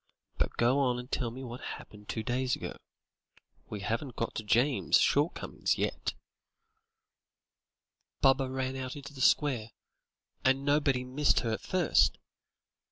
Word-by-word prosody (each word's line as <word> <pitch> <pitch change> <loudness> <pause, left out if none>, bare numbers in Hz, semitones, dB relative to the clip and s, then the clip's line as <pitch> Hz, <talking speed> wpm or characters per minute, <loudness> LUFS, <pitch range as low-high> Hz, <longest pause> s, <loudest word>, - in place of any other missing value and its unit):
But - - -1
go 125 +4 +3
on 125 -3 +2
and 125 +2 -8
tell 120 -3 0
me 130 +3 -8
what 120 0 -7
happened 105 -1 -9
two 110 - -2
days 125 +1 0
ago. - - -6 0.9
We 105 - -5
haven't 120 +4 -3
got 115 - -2
to 110 - -4
James's 120 +6 +3
shortcomings 150 +5 +1
yet." - - -2 2.0
"Baba 135 -1 +4
ran 130 0 -2
out 130 -1 -5
into 145 0 -9
the 135 - -8
square, 125 -6 +3 0.7
and 135 +1 +2
nobody 145 -3 +2
missed 135 +3 +2
her 115 - -1
at 110 - -2
first. 185 -3 +3
130 Hz, 140 wpm, -30 LUFS, 120-140 Hz, 2.0 s, Baba